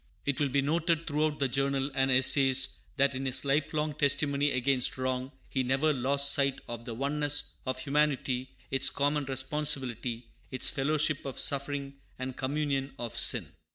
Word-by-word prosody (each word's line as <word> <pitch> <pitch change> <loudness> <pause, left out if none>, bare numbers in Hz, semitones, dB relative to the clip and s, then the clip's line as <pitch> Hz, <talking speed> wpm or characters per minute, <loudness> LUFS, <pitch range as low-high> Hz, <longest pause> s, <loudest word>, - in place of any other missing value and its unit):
It 140 -1 0
will 145 -2 +1
be 140 +1 +1
noted 165 +2 0
throughout 150 0 -1
the 135 - 0
Journal 135 +1 -1
and 135 0 +1
essays 130 0 +4 0.2
that 140 0 +3
in 130 +1 -3
his 130 - +1
lifelong 150 +2 0
testimony 145 0 +1
against 125 0 +2
wrong 130 0 -3 0.2
he 130 - -1
never 135 +4 +1
lost 140 +2 +3
sight 140 -1 +2
of 115 0 -7
the 115 - -6
oneness 145 +2 0 0.2
of 130 0 -2
humanity, 135 -2 -1 0.2
its 135 0 +2
common 145 0 -1
responsibility, 130 -3 -1 0.2
its 130 -1 +1
fellowship 150 +1 +1
of 135 -2 -6
suffering 140 0 0 0.2
and 130 0 -5
communion 135 0 -2
of 120 -4 -6
sin. - - +2
140 Hz, 155 wpm, -29 LUFS, 130-145 Hz, 0.2 s, essays